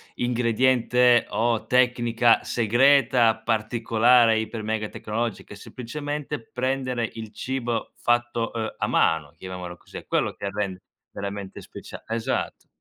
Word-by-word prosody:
ingrediente 125 0 +3
o 115 +2 0
tecnica 120 -2 +3
segreta 120 0 +4
particolare 115 +1 +3
iper 110 0 -5
mega 110 0 -2
tecnologica, 110 -1 -4
è - - -11
semplicemente 145 +5 -5
prendere 130 -2 -2
il 110 -1 -8
cibo 125 -3 -3
fatto, 120 -1 0
uhm, 110 -1 -2
a - - -1
mano, 80 -3 +1
chiamiamolo 90 -1 -7
così, - - -12
è - - -9
quello - - 0
che 100 - -5
rende 100 -2 -3 0.3
veramente 100 -1 -6
specia - - -11
esatto. 115 0 -3
115 Hz, 120 wpm, -24 LUFS, 110-125 Hz, 0.3 s, segreta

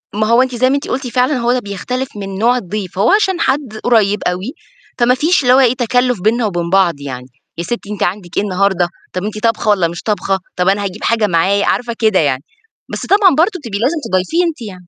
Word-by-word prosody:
ما 215 +1 +1
هو 235 +3 +4
أنتِ 260 -1 -1
زي 255 +2 +2
ما 275 - +2
أنتِ 285 - -3
قلتِ 260 0 -3
فعلًا 250 +4 +1
هو 240 0 +1
ده 255 - +1
بيختلف 250 +5 -4
من 195 -1 -6
نوع 240 +4 +2
الضيف، 195 -3 -5
فهو 200 +5 +2
عشان 385 -3 +2
حد 265 -7 -1
قريّب 210 -4 +3
أوي، 185 +9 -3 0.5
فما 245 +1 +4
فيش 320 +4 +2
اللي 250 0 +5
هو 260 - +6
إيه 250 -3 +4
تكلُّف 245 -3 0
بيننا 225 +4 +1
وبين 175 -4 -2
بعض 190 -2 +3
يعني، 125 -2 -7 0.3
يا 170 - -3
سِتّي 210 +2 -5
أنتِ 205 - -2
عندِك 175 -1 -3
إيه - - +2
النهارده 190 -2 +1 0.3
طَب 185 - -3
أنتِ 215 +1 -4
طابخة 225 -1 +1
والّا 190 -5 +3
مش 170 +1 -7
طابخة؟ 195 -2 -1 0.2
طَب 180 0 0
أنا 200 +1 +1
هاجيب 200 +2 -5
حاجة 225 -2 +2
معايا. 195 +3 +2
عارفة، 240 -1 -1
كده 215 -4 +3
يعني. 140 -3 0 0.5
بس - - -4
طبعًا 390 -5 +4
برضه 365 +4 +2
تبقى 205 -5 -4
لازم 280 +8 +1
تضيفيه 185 - +1
أنتِ 330 -6 -3
يعني. 185 -5 -9
215 Hz, 230 wpm, -16 LUFS, 190-250 Hz, 0.5 s, هو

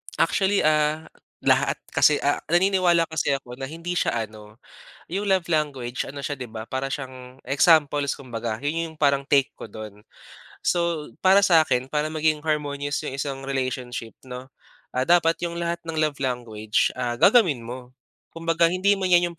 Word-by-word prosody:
Actually, 195 +1 +2
ah, 155 +1 +2 0.4
lahat - - +3 0.2
kasi 150 - +5
ah, 145 - +2
naniniwala 175 -1 +3
kasi 160 -3 -2
ako 125 -2 -8
na 135 0 -5
hindi 165 +3 -5
siya 120 -9 0
ano 105 0 -15 0.5
yung 195 +4 -2
love 190 -4 +1
language 140 -6 -1
ano 140 +1 -7
siya 145 +1 -3
di 130 - -6
ba 110 -1 -8
para 135 +1 -3
siyang 130 -1 -8
examples 145 -1 +3
kumbaga 115 -4 -5
yun 160 +3 -2
yung - - -19
parang 140 -2 +3
take 140 -1 +3
ko - - -9
dun. 105 -1 -10 0.6
So, 170 -3 0
para 190 +2 +7
sa 165 -5 +5
akin 125 +1 -1
para 150 0 0
maging 155 -1 0
harmonious 145 -1 -1
yung 135 -3 -5
isang 135 -1 -4
relationship 130 -3 -4
'no, 125 0 -8 0.5
ah, 130 - +1
dapat 170 -1 +4
yung 170 0 -3
lahat 170 0 -2
ng 165 -1 -6
love 155 -3 0
language 115 -4 -1
ah, 120 -1 -2
gagawin 180 - +4
mo. 125 +1 -8 0.5
Kumbaga 165 0 +2
hindi 185 +3 +2
man 190 - 0
yan 175 -1 +4
yung, - - -18
145 Hz, 170 wpm, -24 LUFS, 130-165 Hz, 0.6 s, para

